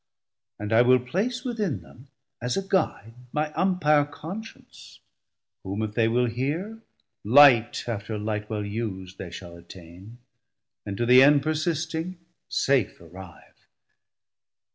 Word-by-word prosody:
And 105 +1 -4
I 115 - +6
will 125 +1 +5
place 200 - -2
within 215 - -2
them 125 +3 -17 0.3
as 125 +1 -2
a 195 0 -3
guide 115 - -1 0.2
My 150 0 -2
Umpire 160 -5 +2
Conscience, 175 +9 -10 0.6
whom 100 +3 -3
if 105 -1 -4
they 115 0 +2
will 120 +2 +2
hear, 150 - -3 0.4
Light 120 0 +6
after 110 -1 -4
light 105 0 -4
well 105 -2 -3
us'd 100 -4 -5
they 90 - -6
shall 85 0 -10
attain, 90 +5 -13 0.7
And 100 -1 -4
to 120 - 0
the 125 +2 +7
end 145 0 +5
persisting, 160 +2 -2 0.3
safe 130 -7 +1
arrive. 85 +1 -14
125 Hz, 130 wpm, -25 LUFS, 105-155 Hz, 0.7 s, the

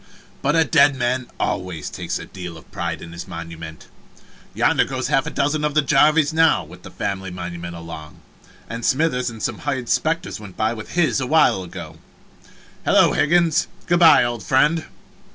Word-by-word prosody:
But 145 +3 +1
a 165 - +5
dead 145 -3 +4
man 125 0 -1
always 90 -4 -3
takes - - -4
a - - -8
deal 90 -3 -8
of 80 - -17
pride - - -4
in 85 - -10
his 85 +2 -8
monument. 80 -2 -8 0.7
Yonder - - +3
goes - - -3
half - - +2
a - - -1
dozen 150 +1 0
of 150 -1 -1
the 150 - +4
Jarvises 150 +2 +4
now, 160 0 +4
with - - -14
the - - -11
family 95 -1 -4
monument 85 -1 -6
along. 80 -2 -9 0.5
And 115 +1 -6
Smithers 130 -3 +1
and 115 -2 -9
some - - -2
hired 135 -5 -3
specters 165 -6 0
went 100 -4 -11
by 110 +1 +1
with 110 -2 -9
his 165 -6 +2
awhile 130 -7 +3
ago. 85 -3 -9 0.9
Hello, - - +4
Higgins, 170 +1 +2 0.2
good 175 0 +2
by, 165 -2 +7
old 120 -2 -2
friend! 150 - +2
120 Hz, 175 wpm, -21 LUFS, -, 0.9 s, by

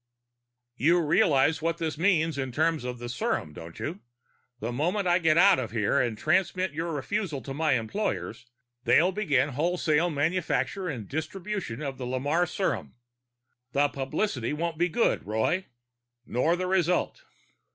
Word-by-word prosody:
"You 170 +7 +4
realize 160 -2 +3
what 165 +1 0
this 160 -3 -2
means 165 -3 +2
in 130 -1 -2
terms 160 +2 +1
of 125 0 -4
the 120 0 -7
serum, 120 -9 -2
don't 80 +1 -10
you? 175 +6 -4 0.6
The 115 +3 -3
moment 180 +10 0
I 175 +1 +4
get 160 -2 +3
out 190 -1 +6
of 120 -3 -3
here 105 -2 +1
and 115 -3 -1
transmit 185 - +1
your 165 +2 -3
refusal 160 +1 -2
to 135 - -6
my 155 0 +1
employers, 125 - -2 0.4
they'll 155 +9 +4
begin 150 -9 +1
wholesale 160 +2 +1
manufacture 165 +2 -1
and 115 -9 -5
distribution 160 - -4
of 135 -2 -5
the 125 - -4
Lamarre 145 +7 0
serum. 190 - -2 0.8
The 145 +1 +3
publicity 135 - -2
won't 165 +1 -3
be 175 +1 +2
good, 230 +8 +1
Roy. 110 - 0 0.6
Nor 140 +10 +1
the 185 +1 -2
result." 180 - +1
155 Hz, 150 wpm, -27 LUFS, 130-180 Hz, 0.8 s, out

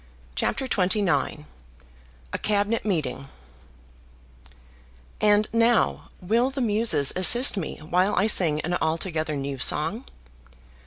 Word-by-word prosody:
CHAPTER 265 - -2
XXIX 185 -7 -1 0.9
A - - -1
Cabinet 210 +2 -1
Meeting 150 -9 -3 1.9
And 210 0 +3
now 230 0 +1
will 230 +7 0
the 270 0 -7
Muses 210 - +2
assist 240 +9 +6
me 190 -5 -5
while 180 +5 -1
I 200 - +1
sing 165 -8 +2
an 175 +2 -3
altogether 160 -1 -2
new 140 -1 -5
song? 165 - -1
190 Hz, 105 wpm, -24 LUFS, 155-220 Hz, 1.9 s, assist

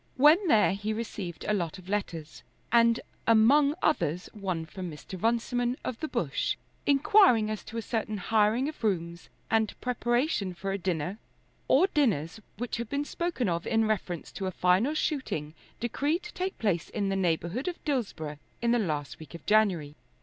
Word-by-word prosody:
When 310 +8 +6
there 215 - +5
he 205 +2 -2
received 210 -6 -5
a 210 - +2
lot 175 -4 -2
of 185 -1 -14
letters, 175 -6 -3 0.3
and 230 0 +5 0.3
among 275 +7 +5
others 175 - 0
one 185 -6 -3
from 180 +2 -6
Mr. 170 +4 -9
Runciman, 240 +2 +1
of 240 - -4
the 315 - -2
Bush, - - -1 0.3
inquiring 280 - +5
as 215 - -4
to 230 - -7
a 230 - -2
certain 215 -1 -2
hiring 220 +6 +2
of 305 -5 -7
rooms 170 -5 -2 0.2
and 220 -1 +1
preparation 240 - 0
for 195 +3 -3
a 195 - -2
dinner 180 +2 -2 0.5
or - - +5
dinners 220 - 0 0.2
which 245 +2 -3
had 235 -1 -4
been 285 +1 -1
spoken 340 -8 -2
of 170 -1 -1
in 225 -1 +2
reference 190 -6 -2
to 195 - -4
a - - -2
final 185 - +2
shooting 260 - -2 0.3
decreed 285 - -1
to 425 - -9
take 370 +1 -3
place 185 -7 0
in 200 -3 -1
the 195 - 0
neighbourhood 180 - -1
of 355 - -5
Dillsborough 195 - -2 0.2
in 235 0 +1
the 240 - +3
last 150 -8 -2
week 160 +1 -11
of 170 - -11
January. 190 -9 +2
215 Hz, 175 wpm, -29 LUFS, 180-250 Hz, 0.5 s, When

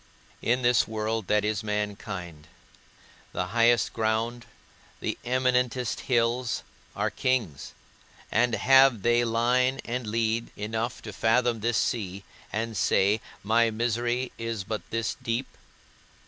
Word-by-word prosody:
In 125 +2 +1
this 120 -2 +4
world 110 -1 -2
that 105 0 +2
is 105 -1 -1
mankind, 100 -6 -4 0.9
the 90 - -1
highest 115 -1 +3
ground, 115 +2 -1 0.5
the - - -2
eminentest 125 -1 +1
hills, 120 0 +1 0.3
are - - 0
kings; 105 - -1 0.6
and 120 +1 +2
have 135 0 +5
they 120 0 +3
line 125 +3 +2
and 120 -1 -3
lead 115 +1 0
enough 110 +3 -3
to 105 - -7
fathom 115 +2 +2
this 115 +1 0
sea, 100 -3 -1 0.3
and 115 +1 -2
say, 100 +2 +2 0.2
My 115 +3 +3
misery 120 +2 -1
is 115 -3 -3
but 110 +2 -4
this 115 -1 -2
deep? 115 +3 -1
115 Hz, 120 wpm, -27 LUFS, 110-120 Hz, 0.9 s, have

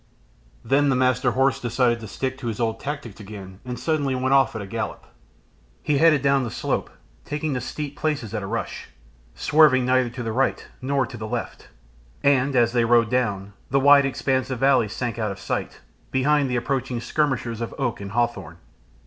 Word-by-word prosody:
Then 140 +1 +3
the 130 - +2
Master 125 0 +2
Horse 135 +2 +2
decided 120 0 +1
to 110 - -8
stick 130 +6 -3
to 120 - -5
his 110 -2 -3
old 115 -1 -1
tactics 140 -8 -6
again, 100 -2 -10
and 125 -1 -5
suddenly 145 -5 0
went 130 +1 +1
off 135 -4 +4
at 110 - -3
a - - -7
gallop. 110 +2 -5 0.8
He 145 -2 +1
headed 155 -4 +5
down 140 0 +3
the 120 - -3
slope, - - -2 0.3
taking 150 0 -3
the 125 - -2
steep 145 +3 -5
places 145 -9 -2
at 110 - -2
a 95 - -5
rush, 115 +2 -4 0.5
swerving 145 -3 +4
neither 130 -1 +2
to 120 +1 -6
the 115 - -2
right 130 +4 0
nor 135 0 +1
to 120 - -9
the 110 0 -5
left, - - -5 0.6
and, 140 -1 +3
as 120 -1 +3
they 120 -2 +3
rode 115 -1 +3
down, 100 -6 -1 0.2
the 135 - +3
wide 140 0 +6
expanse 130 -1 -1
of 130 - -2
valley 135 -3 +3
sank 115 +2 -4
out 110 -2 -1
of 100 - -7
sight - - -4 0.3
behind 140 +1 +2
the 125 - -1
approaching 125 0 -1
skirmishers 120 -4 -1
of 115 - -4
oak 130 -7 -2
and 100 0 -7
hawthorn. 100 -9 -1
125 Hz, 195 wpm, -23 LUFS, 115-135 Hz, 0.8 s, wide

